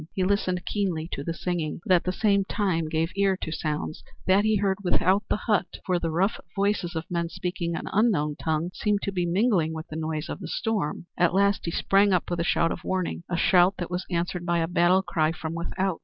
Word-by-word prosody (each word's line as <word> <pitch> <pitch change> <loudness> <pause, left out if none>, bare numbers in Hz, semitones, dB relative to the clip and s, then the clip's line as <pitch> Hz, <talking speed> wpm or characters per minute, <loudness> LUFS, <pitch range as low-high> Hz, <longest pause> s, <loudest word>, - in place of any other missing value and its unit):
He 190 - 0
listened 185 -2 0
keenly 180 -6 -1
to 140 - -4
the 165 - -2
singing, 170 -2 -3
but 185 - +3
at 175 - +3
the 180 - +1
same 200 0 +2
time 185 -6 -1
gave 160 +2 0
ear 195 -1 +2
to 160 - -5
sounds 155 0 -3 0.2
that 190 +2 +4
he 215 0 +3
heard 195 -1 +1
without 185 +2 +3
the - - +2
hut, 210 -3 0
for 180 -2 +1
the 165 - -2
rough 185 +7 +1 0.2
voices 200 -3 0
of 160 - -2
men 170 -1 -1
speaking 175 -1 -3
an - - -4
unknown 180 -9 +2
tongue 160 +2 -1
seemed 210 -1 0
to 200 - -1
be 180 -2 -1
mingling 175 -4 +2
with 160 0 -6
the 155 - -6
noise 155 -1 -3
of - - -5
the - - -6
storm. 210 -8 -2
At 175 0 +3
last 200 +1 +2
he 170 - -1
sprang 195 +3 +3
up 180 -1 0
with 175 - -1
a - - +1
shout 165 -1 +2
of - - -5
warning, 185 -2 -2
a 175 - -1
shout 180 +2 +4
that 175 0 -5
was 180 +1 -3
answered 175 0 -2
by 175 -1 +1
a 165 -1 +1
battle 175 +2 +3
cry 165 -3 +1
from 160 0 -5
without. 175 +2 -2
180 Hz, 230 wpm, -26 LUFS, 165-195 Hz, 0.2 s, that